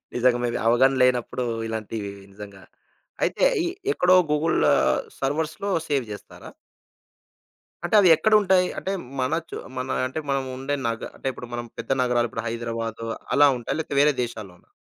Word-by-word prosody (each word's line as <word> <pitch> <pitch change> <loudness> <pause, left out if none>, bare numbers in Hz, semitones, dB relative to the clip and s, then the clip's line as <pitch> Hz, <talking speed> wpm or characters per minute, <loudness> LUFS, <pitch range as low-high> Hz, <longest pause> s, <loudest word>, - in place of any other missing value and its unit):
నిజంగా 120 0 +3
మేబీ 120 - -1
అవగాహన 130 +3 +4
లేనప్పుడు 125 0 +1 0.2
ఇలాంటివి 110 -2 -4 0.2
నిజంగా. 100 -2 -11 0.6
అయితే, - - +2 0.2
ఈ - - 0 0.3
ఎక్కడో 185 +1 +4 0.2
గూగుల్ 150 +2 +1 0.6
సర్వర్స్‌లో 155 +7 -2 0.2
సేవ్ 140 -5 0
జేస్తారా? 105 - -10 1.3
అంటే, 175 - -1
అవి 185 - +5
ఎక్కడుంటాయి? 190 0 +3
అంటే, 190 - -3 0.3
మన 130 +5 0 0.2
చు - - -6 0.2
మన 130 0 -3 0.2
అంటే 145 +5 -4
మనం 135 -1 0
ఉండే 135 +2 -2
నగ 115 -1 -2
అంటే, - - -9
ఇప్పుడు 125 -1 -9
మనం 120 0 -4
పెద్ద 115 +3 -7
నగరాలు 120 -1 +1
,ఇప్పుడు - - -5
హైదరాబాదు, 115 -1 -4 0.3
అలా 145 0 +7
ఉంటాయా? 120 - -3
లేతే 145 -3 -4
వేరే 150 +1 +5
దేశాల్లోనా? 105 -7 -8
125 Hz, 145 wpm, -24 LUFS, 115-150 Hz, 1.3 s, అలా